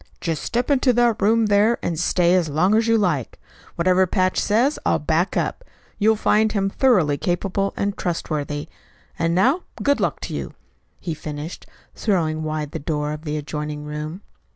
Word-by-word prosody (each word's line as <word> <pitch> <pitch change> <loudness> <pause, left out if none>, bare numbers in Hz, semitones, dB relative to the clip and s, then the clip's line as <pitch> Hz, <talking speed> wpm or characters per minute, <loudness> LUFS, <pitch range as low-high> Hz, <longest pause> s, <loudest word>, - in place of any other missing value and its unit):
"Just 165 -3 -2
step 245 +4 -1
into 255 -2 +3
that 240 -2 +2
room 225 +3 +3
there 210 +3 +3
and 165 -3 -2
stay 175 0 +2
as 180 -4 +2
long 170 +7 +2
as 225 +1 +3
you 230 0 +4
like. 170 - -1 0.4
Whatever 185 +2 +3
Patch 185 0 +1
says 245 +8 +2
I'll - - +2
back 160 +4 0
up. - - -2 0.4
You'll 220 +1 +4
find 215 0 +2
him 195 -2 0
thoroughly 180 - +3
capable 195 +2 -1
and 200 0 -1
trustworthy. 150 -3 -3 0.5
And 165 0 +1
now 265 - +3 0.2
good 285 0 +2
luck - - -1
to - - -5
you," - - -5 0.4
he 170 - -4
finished, 150 +2 -7 0.3
throwing 160 -7 0
wide 155 -1 -3
the - - -4
door 150 0 -2
of 155 +2 -8
the 150 0 -2
adjoining 150 0 -5
room. 150 +5 -6
180 Hz, 175 wpm, -22 LUFS, 155-215 Hz, 0.5 s, you